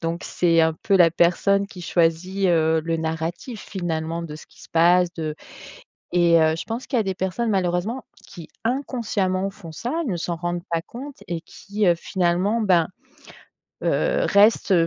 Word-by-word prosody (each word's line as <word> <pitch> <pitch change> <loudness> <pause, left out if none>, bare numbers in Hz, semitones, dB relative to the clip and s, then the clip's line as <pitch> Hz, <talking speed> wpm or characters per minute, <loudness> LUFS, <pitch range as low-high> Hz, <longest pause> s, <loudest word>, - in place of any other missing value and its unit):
donc 165 +2 -3
c'est 170 -2 +2
un 160 0 +3
peu 200 - +3
la 170 -3 +5
personne 200 +4 +2
qui 185 -3 -10
choisit, 175 +4 +1
heu, 160 -1 +3
le 165 0 0
narratif 165 +8 -4
finalement 165 -3 -3
de 150 - -7
ce 155 - -11
qui - - -20
se - - -14
passe 175 +2 +4
de 155 -2 -4 0.8
et 170 -1 +5
heu, 160 0 +3
je - - -4
pense 230 +3 -5
qu'il 265 - 0
y - - +4
a - - -2
des 190 -1 -2
personnes 190 +6 -2
malheureusement 190 +5 -1 0.2
qui, 170 -5 -11 0.2
inconsciemment 215 -7 -1
font 195 -5 -11
ça, 235 +11 -4 0.2
ne 195 - -1
s'en 170 0 -3
rendent 175 0 -3
pas 165 -1 0
compte 265 - -9
et 170 -1 -2
qui, 200 +4 -4
heu, 175 - +5
finalement 180 +5 0
ben, 180 -5 +3 1.0
heu, - - +1
restent 205 0 +4
175 Hz, 180 wpm, -23 LUFS, 165-200 Hz, 1.0 s, la